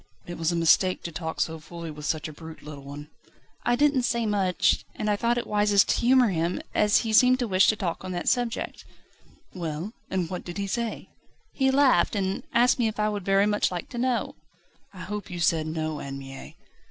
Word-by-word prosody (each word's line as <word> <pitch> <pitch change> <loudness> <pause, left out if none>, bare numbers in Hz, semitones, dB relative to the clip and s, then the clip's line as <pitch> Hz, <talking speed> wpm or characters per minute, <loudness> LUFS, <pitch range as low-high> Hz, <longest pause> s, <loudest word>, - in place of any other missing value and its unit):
"It 175 -1 -7
was 165 +1 +1
a - - -1
mistake 170 +2 +3
to 170 - -5
talk 160 0 -5
so 160 0 -2
fully 170 +1 -8
with 150 0 -7
such 160 +1 -1
a 155 - -9
brute, 160 +1 -11
little 145 -2 -9
one." 145 +2 -9 0.5
"I 240 - +2
didn't 285 0 +3
say 235 -1 0
much, 195 -4 +1
and 210 0 -1
I - - +2
thought 235 +3 0
it 240 - -2
wisest 205 -1 +3
to - - +3
humour 250 -1 +5
him, 170 -1 -1
as 210 0 +4
he 220 - -1
seemed 250 +3 +6
to 245 -2 -2
wish 190 -1 +4
to 215 - +4
talk 185 -5 -3
on 185 - -5
that 175 - -4
subject." 245 -2 -1 0.7
"Well? 170 +3 -5 0.2
And 185 -3 -1
what 180 +1 -5
did 175 0 -7
he 200 - -2
say?" 230 +3 -3 0.4
"He 265 -1 +2
laughed, 265 -10 +3
and 190 -1 -1
asked 245 0 +3
me 235 - +3
if 215 0 -4
I 210 0 +2
would 205 -2 -4
very 195 +1 +3
much 210 0 +1
like 175 -2 -5
to 240 - -6
know." 250 -1 0 0.6
"I 185 -2 -11
hope 210 +1 -6
you 175 -1 -6
said 160 -1 +2
No, 155 -1 -3
Anne 135 0 -6
Mie?" 135 0 -10
190 Hz, 220 wpm, -26 LUFS, 165-225 Hz, 0.7 s, seemed